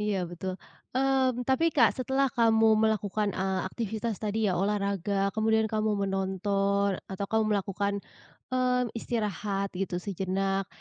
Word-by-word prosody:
Iya, 205 -3 0
betul. 185 +2 -5 0.4
Mmm, 260 -2 +2
tapi, 325 +6 +3
Kak, - - +4
setelah 265 +1 +1
kamu 225 -3 +4
melakukan, 215 -1 +1
eee, 190 0 0
aktivitas 225 0 -3
tadi 215 0 -1
ya 180 - 0
olahraga 200 -1 0
kemudian 220 0 +2
kamu 215 0 0
menonton 195 +1 0
atau 195 +1 -5
kamu 220 +1 +2
melakukan, 200 0 -1 0.5
mmm, 250 -2 +1
istirahat 205 -3 -2
gitu 185 -1 -2
sejenak. 195 0 -1
205 Hz, 130 wpm, -28 LUFS, 195-225 Hz, 0.5 s, Kak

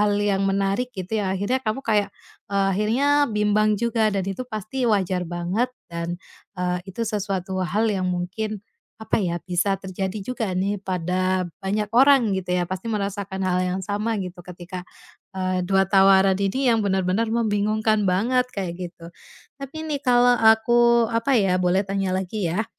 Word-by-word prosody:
hal 205 -1 +2
yang 200 -1 +1
menarik, 195 +5 0
gitu 190 +4 -2
ya, 195 - -1
akhirnya 235 +7 0
kamu 255 +2 -3
kayak, 210 -3 +2 0.4
eee, 200 -1 +1
akhirnya 215 +8 +1 0.2
bimbang 210 0 +2
juga 225 0 +1
dan 195 -3 -1
itu 195 +4 -4
pasti 235 +3 -2
wajar 185 -4 0
banget 175 +8 -1 0.2
dan, 170 +1 -3 0.4
eee, 180 0 -1
itu 215 +5 -3
sesuatu 195 -3 -2
hal 185 +5 0
yang 185 -2 -1
mungkin, 195 +4 -3 0.3
apa 220 0 -1
ya, 175 -3 -1
bisa 185 +2 0
terjadi 190 +1 -5
juga 245 -3 -3
nih 200 +2 -1
pada 185 0 -1 0.2
banyak 205 +2 -2
orang, 260 -3 +5
gitu 190 -1 -3
ya, 180 - +1
pasti 185 +5 -5
merasakan 200 -2 -3
hal 180 -1 +1
yang 185 +1 -1
sama, 210 +3 -1
gitu, 180 -2 -6
ketika, 180 +1 -9 0.5
eee 185 -1 -1
2 195 +2 +2
tawaran 195 0 +5
ini 240 +6 +1
yang 225 - +2
benar-benar 195 +2 0
membingungkan 215 -1 +1
banget, 245 +7 +1
kayak 185 -3 -2 0.2
gitu. 170 0 -14 0.5
Tapi 280 +4 -7
nih, 300 -3 -3
kalau 245 -2 +4
aku, 235 0 +4
apa 240 +4 +2
ya, 190 -4 +2
boleh 185 +2 +2
tanya 195 -1 -1
lagi 190 0 -2
ya, 190 +7 -1
200 Hz, 165 wpm, -23 LUFS, 185-220 Hz, 0.5 s, orang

